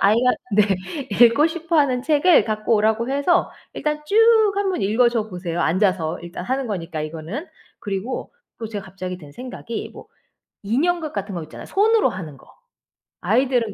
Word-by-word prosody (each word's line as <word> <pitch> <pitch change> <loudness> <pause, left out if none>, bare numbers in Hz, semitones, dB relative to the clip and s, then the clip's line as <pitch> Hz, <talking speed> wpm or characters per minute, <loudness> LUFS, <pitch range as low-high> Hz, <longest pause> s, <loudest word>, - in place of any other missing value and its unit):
아이하 230 +5 +4 0.2
네 210 - +6 0.6
읽고 235 +7 +3
싶어 335 0 -2
하는 260 -5 +2
책을 305 +4 +4
갖고 215 +1 0
오라고 220 +4 +1
해서 285 +5 +2 0.2
일단 300 0 -2
쭉 405 - -1 0.4
한번 390 -2 -1
읽어줘 225 +1 +2
보세요 175 -3 -4
앉아서 180 -2 +1
일단 175 +1 -7
하는 265 +3 -1
거니까 170 -7 -4
이거는. 160 - -5 0.3
그리고 205 - -4 0.3
또 225 - -4
제가 205 -2 -6
갑자기 185 -1 -7
든 150 -4 -13
생각이 235 - -7
뭐 - - -12 0.6
인형극 310 - 0
같은 200 0 -4
거 170 - -3
있잖아요 155 - -10
손으로 435 +2 +3
하는 160 -6 -7
거. - - -20 0.7
아이들은 250 -5 +1
225 Hz, 335 characters per minute, -22 LUFS, 185-280 Hz, 0.7 s, 네